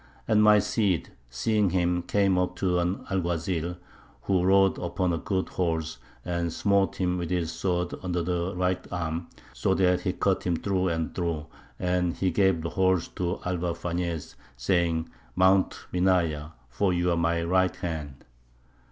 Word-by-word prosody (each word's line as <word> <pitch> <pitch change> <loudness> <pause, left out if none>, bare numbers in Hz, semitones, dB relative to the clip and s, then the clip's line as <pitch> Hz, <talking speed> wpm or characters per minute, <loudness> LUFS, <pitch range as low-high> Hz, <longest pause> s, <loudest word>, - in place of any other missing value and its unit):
And 110 -2 +4
my 105 0 +7
Cid, 100 -4 +1 0.2
seeing 100 - +1
him, 90 -1 +1
came 95 +1 +2
up 90 0 0
to 90 -1 +1
an 90 +3 -1
Alguazil, 85 -1 -1 0.5
who 95 -2 +2
rode 95 +1 +4
upon 90 0 -1
a 85 - -1
good 95 +1 -2
horse, 80 -3 -2 0.3
and 85 -1 -1
smote 100 +2 +1
him 90 -2 0
with 85 - -3
his 85 -2 -1
sword 90 -2 -1
under 90 -2 -1
the 90 +2 -2
right 90 0 0
arm, 85 -1 -3 0.3
so 95 - +1
that 90 -1 +3
he - - -1
cut - - 0
him 85 - +2
through 95 +1 0
and 80 -2 -2
through, 85 -4 -2 0.3
and 90 -1 0
he 95 -1 0
gave 95 -2 +2
the 85 - -2
horse 95 -2 +2
to 90 0 -3
Alvar 90 -1 -1
Fañez, 85 -1 -3 0.2
saying, 80 +4 +1 0.3
Mount 95 +1 +4 0.2
Minaya, 90 -5 +1 0.2
for 90 +10 0
you 90 0 +1
are - - +2
my 85 0 +1
right 95 +1 +2
hand." 75 -6 -5
90 Hz, 160 wpm, -27 LUFS, 85-95 Hz, 0.5 s, my